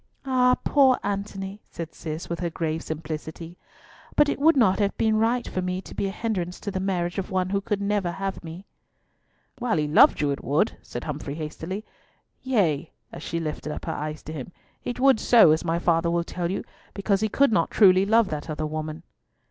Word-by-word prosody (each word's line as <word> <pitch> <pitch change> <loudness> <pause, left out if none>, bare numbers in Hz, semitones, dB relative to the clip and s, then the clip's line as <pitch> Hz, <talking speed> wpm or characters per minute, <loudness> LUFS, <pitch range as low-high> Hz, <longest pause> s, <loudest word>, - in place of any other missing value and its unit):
"Ah, 250 -1 +3
poor 270 -3 +5
Antony!" 200 0 -4
said 165 -1 -7
Cis, 155 +1 -6
with 170 - -4
her 175 -1 -1
grave 160 -1 -2
simplicity. 160 +2 -6 0.6
"But 295 -1 +5
it - - -2
would 320 +1 +5
not 215 -6 +4
have 200 -1 0
been 220 -1 +2
right 240 +2 +1
for 185 - -2
me 180 0 -2
to - - -11
be 200 - -1
a - - -3
hindrance 190 -5 -3
to 200 - -4
the 190 - -2
marriage 180 -2 -1
of 190 - -4
one 185 -1 0
who 200 0 +1
could 205 0 -2
never 200 -3 0
have 195 0 -4
me." 170 +4 -9 0.9
"While 240 -8 0
he 150 -1 0
loved 150 - +6
you 145 -1 +1
it 140 - -4
would," 150 +10 +1
said 120 - -7
Humfrey 145 -1 -5
hastily. 165 +6 -5 0.6
"Yea," 175 - +1 0.2
as - - -9
she 170 - -3
lifted 155 -1 -4
up - - -6
her - - -2
eyes 155 0 -5
to 155 - -7
him, 150 +2 -7 0.3
"it 245 - -4
would 265 -3 +5
so, 225 -10 +6
as 155 - +2
my 165 -1 0
father 170 -1 +2
will 170 0 +1
tell 170 0 -3
you, 195 - -2 0.3
because 200 0 +1
he 220 - +1
could 280 +3 +3
not 170 -7 +2
truly 190 -3 +6
love 225 +1 +3
that 150 +1 -5
other 155 0 -2
woman." 155 +1 -5
185 Hz, 210 wpm, -25 LUFS, 160-210 Hz, 0.9 s, loved